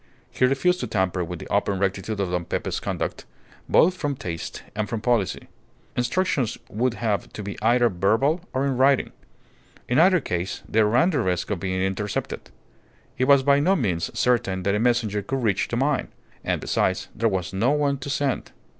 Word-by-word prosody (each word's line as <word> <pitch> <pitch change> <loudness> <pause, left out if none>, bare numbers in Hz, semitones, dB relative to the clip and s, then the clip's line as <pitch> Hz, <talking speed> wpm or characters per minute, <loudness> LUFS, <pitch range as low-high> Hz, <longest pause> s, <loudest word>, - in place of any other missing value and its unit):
He 125 +1 +2
refused 135 +8 +2
to - - -3
tamper 95 -2 0
with 90 +1 -5
the - - -9
open 100 -1 +1
rectitude 100 +2 -2
of 95 -3 -1
Don 90 -1 -1
Pepe's - - -2
conduct, - - -4 0.4
both 180 - +5
from 145 -5 -2
taste 85 -9 -6
and 105 -1 -2
from 115 - -2
policy. 110 -3 0 0.5
Instructions 125 - 0
would 120 +4 0
have 105 -6 -2
to 105 - -6
be 100 +1 -5
either 120 +2 +4
verbal 110 - +1
or 130 +1 0
in 135 -3 0
writing. 135 +1 +3 0.8
In 125 +4 +2
either 180 +2 +6
case 90 - -3
they 110 - +2
ran 120 - +3
the 150 - 0
risk 90 -5 -1
of 100 - -1
being 95 +1 -1
intercepted. 95 +2 -3 0.7
It 130 - +3
was 140 -1 +5
by 140 +1 +4
no 185 +7 +3
means 95 - -1
certain 100 -7 +1
that 100 +1 +1
a 105 - +1
messenger 115 -3 +1
could 130 +6 -3
reach 100 -4 +1
the 120 - -2
mine; 135 +1 +1 0.4
and, - - 0
besides, 95 0 0
there 115 +2 +1
was 95 -2 -3
no 105 +7 +2
one 145 -1 +1
to 135 - -6
send. 140 -2 -1
115 Hz, 190 wpm, -24 LUFS, 95-135 Hz, 0.8 s, either